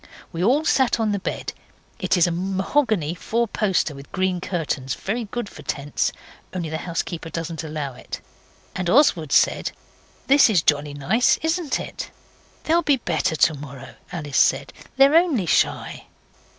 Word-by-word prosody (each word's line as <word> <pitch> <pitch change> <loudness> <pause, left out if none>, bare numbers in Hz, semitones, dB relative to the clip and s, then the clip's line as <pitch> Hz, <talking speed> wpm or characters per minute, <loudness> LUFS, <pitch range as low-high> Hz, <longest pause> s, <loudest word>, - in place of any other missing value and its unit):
We 170 0 -3
all 275 +9 +3
sat 260 -6 +3
on 220 -2 +1
the 200 - -1
bed - - -4 0.5
it - - +1
is 175 - +5
a 175 - 0
mahogany 190 - 0
fourposter 210 -4 0
with 140 0 -12
green 185 -1 0
curtains 160 -8 -2
very 225 +4 -3
good 240 +1 -4
for - - -12
tents, 145 0 -2 0.4
only 170 -3 -3
the 160 0 -3
housekeeper 165 -1 -4
doesn't 165 0 -4
allow 150 -3 -4
it, - - -8 0.6
and 180 -1 -2
Oswald 180 - +4
said - - +3 0.5
'This 280 -2 +6
is 190 -7 +3
jolly 145 -1 +1
nice, 215 - +2
isn't 320 -1 0
it?' - - -6 0.5
'They'll 335 +2 +3
be 290 -4 +3
better 160 - -1
to 160 - +4
morrow,' 140 -2 -9 0.2
Alice 145 -6 -1
said, 135 +1 +2 0.2
'they're 275 +2 +6
only 325 - +3
shy. 155 - 0
180 Hz, 155 wpm, -23 LUFS, 155-235 Hz, 0.6 s, This